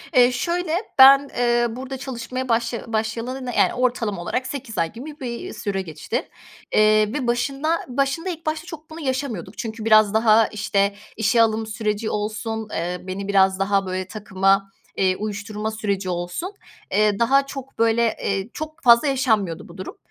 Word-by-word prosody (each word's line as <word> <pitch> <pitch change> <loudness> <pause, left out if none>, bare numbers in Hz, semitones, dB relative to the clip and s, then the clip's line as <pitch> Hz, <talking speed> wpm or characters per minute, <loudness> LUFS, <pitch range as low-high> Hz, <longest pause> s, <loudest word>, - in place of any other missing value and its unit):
Eee, 250 0 +6
şöyle, 340 +5 -1 0.3
ben, 275 +1 +9
eee, 240 -1 +3
burada 260 +3 -6
çalışmaya 255 0 -5
başlaya 230 0 -1
başlayalı, 230 +4 -2
yani, - - +4
ortalama 235 -7 -1
olarak 255 +8 -2
8 255 -7 -6
ay 165 -1 0
gibi 295 +6 -9
bir 240 -3 -5
süre 200 -2 -3
geçti, 160 +3 -4 0.4
eee, 215 0 +4
ve 265 -4 -2
başında 275 +7 0
başında 275 +7 -1
ilk 330 -2 -6
başta 310 +1 -2
çok 320 -3 -10
bunu 320 +1 -9
yaşamıyorduk. 260 - -3
Çünkü 225 -1 -5
biraz 215 -2 +5
daha, 220 0 +5
işte, 200 -1 0 0.2
işe 225 +1 +3
alım 220 -1 +1
süreci 215 0 -2
olsun, 220 +1 -3
eee, 175 +2 -2
beni 195 +2 -4
biraz 190 -1 +3
daha, 195 0 +1
böyle, 185 0 -3
takıma, 195 -1 +1 0.3
eee, 185 -1 +2
uyuşturma 210 +1 -4
süreci 200 -3 -2
olsun, 180 - -3 0.4
eee, 210 0 +2
daha 275 +4 +4
çok, 270 -3 -9
böyle, 230 0 +3
eee, 195 +2 -1
çok 310 +1 -7
fazla 235 +3 +6
yaşanmıyordu 220 - 0
bu 175 +2 -13
durum. 185 - -7
225 Hz, 160 wpm, -22 LUFS, 205-260 Hz, 0.4 s, ben